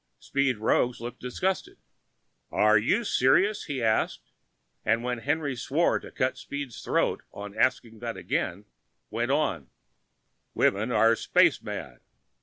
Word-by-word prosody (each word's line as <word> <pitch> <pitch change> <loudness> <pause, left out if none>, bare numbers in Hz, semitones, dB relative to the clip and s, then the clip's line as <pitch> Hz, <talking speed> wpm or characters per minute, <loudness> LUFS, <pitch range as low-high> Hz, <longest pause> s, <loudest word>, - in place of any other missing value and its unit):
Speed 140 -3 0
Roggs 120 +3 +1
looked 120 +1 -7
disgusted. 185 +10 -2 0.7
"Are 105 0 +4
you 115 - +2
serious?" 195 - +3
he 135 -5 -3
asked, 110 -1 0 0.5
and 115 +2 +1
when 125 -1 -2
Henry 145 +2 -1
swore 145 +7 +1
to - - -11
cut 130 +1 -1
Speed's 140 -4 -6
throat - - +1
on 100 0 -8
asking 115 -1 0
that 115 -3 -5
again, 90 -1 -2 0.5
went 115 +3 -1
on, 135 - 0 0.9
"Women 105 +5 +2
are 115 0 +4
space - - +3
mad!" - - -7
120 Hz, 130 wpm, -27 LUFS, 110-140 Hz, 0.9 s, Are